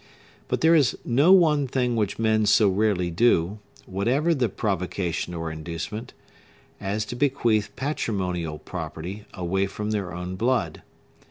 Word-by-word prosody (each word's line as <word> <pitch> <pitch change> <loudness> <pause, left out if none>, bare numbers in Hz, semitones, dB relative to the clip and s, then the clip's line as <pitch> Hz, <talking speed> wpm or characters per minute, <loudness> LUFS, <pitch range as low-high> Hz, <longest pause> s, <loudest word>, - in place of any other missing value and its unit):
But - - -1
there 160 +1 +5
is 145 -6 +3
no 140 +9 +4
one 155 -7 +5
thing 125 -1 0
which 105 -3 -1
men 110 -1 +2
so 105 -1 +5
rarely 95 -3 +1
do, 100 0 +2 0.3
whatever 125 - +1
the 130 -7 +1
provocation 90 -3 -2
or 80 -1 -4
inducement, 85 +8 -6 0.6
as 105 +2 -2
to 120 - -6
bequeath 120 -6 +1
patrimonial 95 - -2
property 95 +8 -7
away 95 +1 0
from 105 +2 -4
their 100 -4 -2
own 90 +2 -5
blood. 115 -8 0
105 Hz, 140 wpm, -25 LUFS, 90-120 Hz, 0.6 s, there